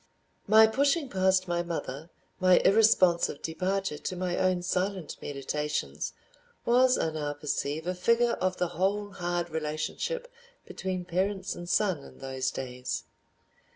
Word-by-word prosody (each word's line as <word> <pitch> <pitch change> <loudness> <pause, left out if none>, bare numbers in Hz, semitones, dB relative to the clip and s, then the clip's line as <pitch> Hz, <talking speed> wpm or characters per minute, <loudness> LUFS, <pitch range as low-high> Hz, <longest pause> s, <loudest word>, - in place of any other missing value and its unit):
My 220 +2 +8
pushing 280 +6 +1
past 190 -1 +2
my 175 0 0
mother, 165 -3 -5 0.3
my 185 -1 +6
irresponsive 190 -7 +4
departure 185 0 -2
to 185 - -4
my 180 -1 -1
own 185 -1 +1
silent 185 -1 -2
meditations, 150 +2 -3 0.5
was, 250 +2 +5
I 160 - 0
now 150 -2 -3
perceive, 145 +1 -3
a 180 - -1
figure 235 +6 +2
of 185 0 0
the 180 -1 0
whole 200 +4 -1
hard 175 -2 -2
relationship 160 - -3 0.4
between 185 -1 -4
parents 190 +2 -1
and 175 0 -8
son 185 -9 +1
in - - -14
those 130 -1 -2
days. 125 -1 -4
180 Hz, 135 wpm, -29 LUFS, 155-195 Hz, 0.5 s, My